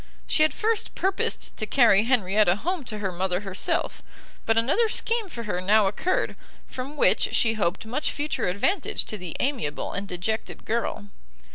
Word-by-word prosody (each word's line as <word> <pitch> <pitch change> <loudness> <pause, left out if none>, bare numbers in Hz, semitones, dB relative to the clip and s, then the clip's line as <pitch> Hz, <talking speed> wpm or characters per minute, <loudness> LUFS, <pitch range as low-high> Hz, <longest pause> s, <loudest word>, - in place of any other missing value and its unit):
She - - +2
had 310 - +5
first 445 0 -1
purposed 385 +1 -1
to 215 - -3
carry 225 -5 +5
Henrietta 210 -6 +3
home 340 - -2
to 215 -3 -4
her 200 -3 -2
mother 180 +1 -1
herself; 195 -2 -2 0.5
but 225 0 +3
another 305 - +3
scheme 455 -2 +1
for 235 -8 -6
her 195 -5 -2
now 210 +3 +4
occurred, 310 - 0 0.3
from 270 +4 -7
which - - +3
she 225 -1 +3
hoped 200 -2 -1
much 255 +7 -1
future 295 +1 -2
advantage 225 - 0
to 215 - -4
the 180 -3 -6
amiable 245 - -2
and 200 0 -3
dejected 195 +5 -3
girl. 220 -2 -2
220 Hz, 165 wpm, -25 LUFS, 195-290 Hz, 0.5 s, had